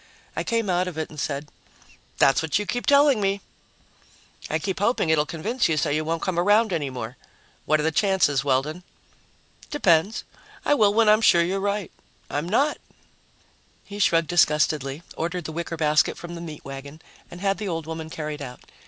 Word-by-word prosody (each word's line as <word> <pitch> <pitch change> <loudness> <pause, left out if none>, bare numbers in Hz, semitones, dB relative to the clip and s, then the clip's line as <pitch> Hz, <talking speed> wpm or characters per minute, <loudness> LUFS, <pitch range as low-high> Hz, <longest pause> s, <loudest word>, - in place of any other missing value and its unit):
I - - -1
came 230 -3 0
out 180 0 +1
of 175 -3 -6
it 160 - -3
and 150 - -9
said, 140 +1 -3 0.7
"That's 135 - +4
what 160 +2 0
you 210 - -2
keep 245 +4 -3
telling 280 -5 +5
me." 195 0 +1 1.1
"I 155 - +1
keep 190 +3 -3
hoping 205 -5 +1
it'll 150 -1 +2
convince 215 - -1
you 160 - +1
so 145 - +1
you 155 +2 0
won't 165 +1 -2
come 180 -2 0
around 205 +3 +3
any 150 -5 -1
more. 125 -1 -6 0.5
What 155 0 +3
are - - 0
the 160 - +1
chances, 185 -7 +2
Weldon?" 145 +5 0 0.9
"Depends. 190 - +2 0.4
I - - +4
will 215 -7 +4
when 225 +1 +3
I'm 215 +1 +5
sure 170 -6 +5
you're 190 +3 -1
right. 200 -1 -2 0.4
I'm 150 +4 -2
not." 280 +9 +2 1.1
He 205 0 -8
shrugged 165 -4 +3
disgustedly, 150 -3 +2
ordered 170 +2 -3
the - - -4
wicker 170 +1 -4
basket 150 -1 +2
from 175 0 -8
the 170 - -7
meat 155 -3 -9
wagon 140 +2 -8 0.3
and 175 - -10
had 195 -1 0
the 210 - -3
old 165 -3 -3
woman 160 0 -6
carried 150 -2 -5
out. 125 -2 -8
170 Hz, 190 wpm, -24 LUFS, 150-200 Hz, 1.1 s, telling